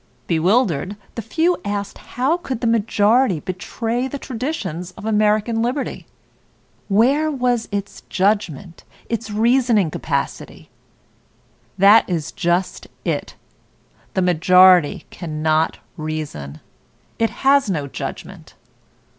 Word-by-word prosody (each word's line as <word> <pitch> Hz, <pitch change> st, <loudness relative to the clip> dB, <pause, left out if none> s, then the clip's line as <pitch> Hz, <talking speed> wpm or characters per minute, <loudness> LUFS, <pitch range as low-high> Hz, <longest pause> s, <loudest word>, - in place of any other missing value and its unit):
Bewildered, 185 Hz, -, +1 dB, 0.2 s
the 230 Hz, -, -5 dB
few 330 Hz, -, 0 dB
asked 205 Hz, -1 st, -4 dB
how 265 Hz, +8 st, -1 dB
could 265 Hz, -9 st, -5 dB
the -, -, -1 dB
majority 225 Hz, -2 st, +2 dB
betray 225 Hz, -, -3 dB
the 280 Hz, -, -5 dB
traditions 225 Hz, -, -4 dB
of -, -, -11 dB
American 215 Hz, +1 st, +2 dB
liberty? 255 Hz, +4 st, -3 dB, 0.8 s
Where 265 Hz, +10 st, +3 dB
was 245 Hz, -5 st, 0 dB
its 200 Hz, 0 st, -4 dB
judgment, 190 Hz, -4 st, -1 dB, 0.3 s
its 230 Hz, -1 st, -3 dB
reasoning 225 Hz, -4 st, +2 dB
capacity? 140 Hz, -3 st, -4 dB, 1.1 s
That 200 Hz, +3 st, +6 dB
is 165 Hz, -5 st, -2 dB
just 175 Hz, +2 st, -1 dB, 0.2 s
it, -, -, -2 dB, 0.8 s
the 190 Hz, -, +2 dB
majority 180 Hz, -1 st, +5 dB
cannot 155 Hz, -1 st, -1 dB, 0.2 s
reason; 150 Hz, -, -5 dB, 0.6 s
it 225 Hz, 0 st, +2 dB, 0.2 s
has 275 Hz, -4 st, +4 dB
no 155 Hz, -7 st, -1 dB
judgment. 140 Hz, -, -8 dB
205 Hz, 105 wpm, -20 LUFS, 175-240 Hz, 1.1 s, That